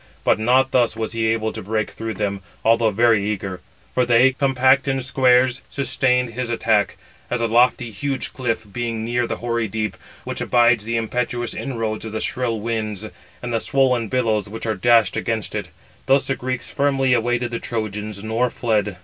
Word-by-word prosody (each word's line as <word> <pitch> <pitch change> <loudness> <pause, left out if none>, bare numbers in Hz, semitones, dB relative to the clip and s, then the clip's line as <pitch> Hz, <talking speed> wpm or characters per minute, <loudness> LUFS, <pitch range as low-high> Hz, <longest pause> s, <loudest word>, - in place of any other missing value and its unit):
But - - +3
not 130 +4 +3
thus 120 -3 +2
was 110 0 -3
he 115 -1 0
able 110 -1 0
to - - -6
break 110 +2 -2
through 110 -1 -5
them, 100 0 -2 0.2
although 115 0 +4
very 110 0 +3
eager; 95 -3 -3 0.3
for 125 - +2
they, 120 +2 +5
compact 135 0 +3
in 135 -1 0
squares, 125 -1 +3
sustained 125 -3 +1
his 120 +1 -4
attack, 110 -3 +1 0.3
as 125 - -1
a 115 - +1
lofty, 120 +1 +3
huge 135 +6 -3
cliff, 115 -4 -2
being 115 -2 -3
near 120 +1 0
the - - -2
hoary 115 -1 -2
deep, 105 -1 -3 0.3
which - - -5
abides 120 -3 +3
the 115 +1 -1
impetuous 120 +1 -2
inroads 115 -5 -3
of 110 -1 -6
the 110 - -2
shrill 120 -2 -1
winds, 110 -2 -3 0.4
and 120 -1 -3
the 115 - +2
swollen 125 -3 +2
billows 110 -3 0
which 110 +2 -6
are 110 - 0
dashed 110 0 +3
against 115 -2 -2
it. - - -4 0.4
Thus 135 +1 +4
the 135 - 0
Greeks 125 0 -4
firmly 135 -2 +2
awaited 120 0 0
the 115 - -3
Trojans, 105 -4 -4
nor 115 +3 0
fled. 105 -5 -1
115 Hz, 185 wpm, -21 LUFS, 110-125 Hz, 0.4 s, they